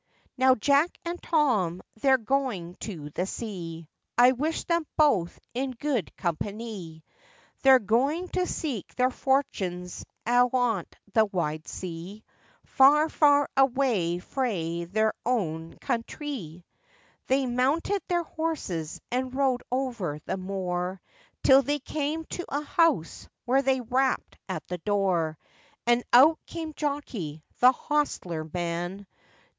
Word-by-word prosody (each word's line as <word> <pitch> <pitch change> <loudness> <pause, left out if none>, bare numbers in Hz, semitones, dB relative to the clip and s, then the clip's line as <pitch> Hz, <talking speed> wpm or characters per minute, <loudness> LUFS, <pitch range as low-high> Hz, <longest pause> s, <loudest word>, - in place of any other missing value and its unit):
Now, 260 0 +5
Jack 280 +8 +2
and 345 +1 -4
Tom, 220 - +1 0.2
they're 265 -1 +5
going 230 -8 -1
to 155 -9 -6
the 180 +5 -2
sea; 170 -8 -6 0.3
I 245 +1 +7
wish 300 +6 -1
them 335 -2 0
both 220 - +3
in 265 +2 -1
good 250 - -2
companie! 180 -2 -4 0.6
They're 265 -1 +8
going 265 - +1
to 365 -1 0
seek 260 - -4
their 255 +1 +2
fortunes 190 -11 -1 0.2
ayont 245 -4 +2 0.3
the 220 0 +5
wide 155 -6 -3
sea, 185 +4 -7 0.4
Far, 300 +3 +5
far 290 -2 +4
away 250 -10 +2
frae 175 -6 -2
their 215 +5 +1
oan 165 -9 -2
countrie! 235 - -4 0.6
They 265 +1 +2
mounted 275 +11 +1
their 345 -2 +1
horses, 300 - -3
and 255 +1 -2
rode 265 -2 +2
over 240 - -2
the - - -2
moor, 185 -1 -3 0.4
Till 265 +1 +7
they 290 +2 0
came 300 +3 -3
to 355 - -4
a 285 - -1
house, 320 - +1 0.2
when 265 +3 +3
they 265 -1 +2
rapped 255 +2 0
at - - -4
the 180 0 -4
door; 180 -5 0 0.5
And 240 +1 +3
out 290 +7 +7
came 320 -2 -5
Jockey, 240 - -4 0.2
the 250 +1 +8
hostler 255 - -2
man. 175 +3 -3
245 Hz, 125 wpm, -27 LUFS, 180-275 Hz, 0.6 s, They're